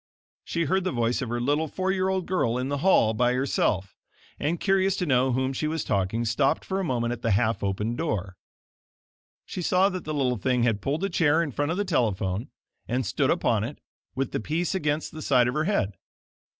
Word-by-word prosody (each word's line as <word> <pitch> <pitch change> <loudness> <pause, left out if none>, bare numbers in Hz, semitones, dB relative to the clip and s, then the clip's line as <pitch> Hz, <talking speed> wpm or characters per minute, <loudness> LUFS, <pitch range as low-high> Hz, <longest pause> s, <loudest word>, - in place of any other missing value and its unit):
She 170 - -1
heard 190 +5 +1
the 185 - -1
voice 120 0 0
of 125 - -3
her 120 +1 -1
little, 145 +6 +1
four 185 +5 -1
year 190 0 0
old 190 -2 -1
girl 125 -11 0
in 130 +2 -2
the 140 0 -1
hall 135 - +4
by 125 +3 +2
herself, 105 -7 0 0.4
and, 160 +4 -1
curious 195 -1 +2
to 180 - -1
know 130 -3 +3
to 130 - 0
whom 130 +1 0
she 155 +4 -1
was 160 0 -2
talking, 100 +4 0
stopped 125 +5 +1
for 190 0 -2
a - - -1
moment 120 -6 0
at 120 - -8
the 115 - 0
half 110 +2 +1
opened 105 +4 -2
door. 100 - -2 1.1
She 180 - -5
saw 185 +3 +3
that 185 -2 -5
the 155 - -4
little 125 -4 +1
thing 125 +3 +1
had 115 -4 +1
pulled 150 - -1
a 195 - +1
chair 160 0 +3
in 150 - -4
front 145 +4 -1
of 165 - -1
the 205 - 0
telephone, 105 - 0 0.4
and 125 +1 -1
stood - - 0
upon 110 -2 +2
it, 130 +6 -5 0.4
with 135 -1 -1
the - - -1
piece 160 - -1
against 155 -4 -1
the 155 - -8
side 125 -5 +3
of 125 - -1
her 155 +2 0
head. 105 - 0
135 Hz, 225 wpm, -26 LUFS, 115-170 Hz, 1.1 s, hall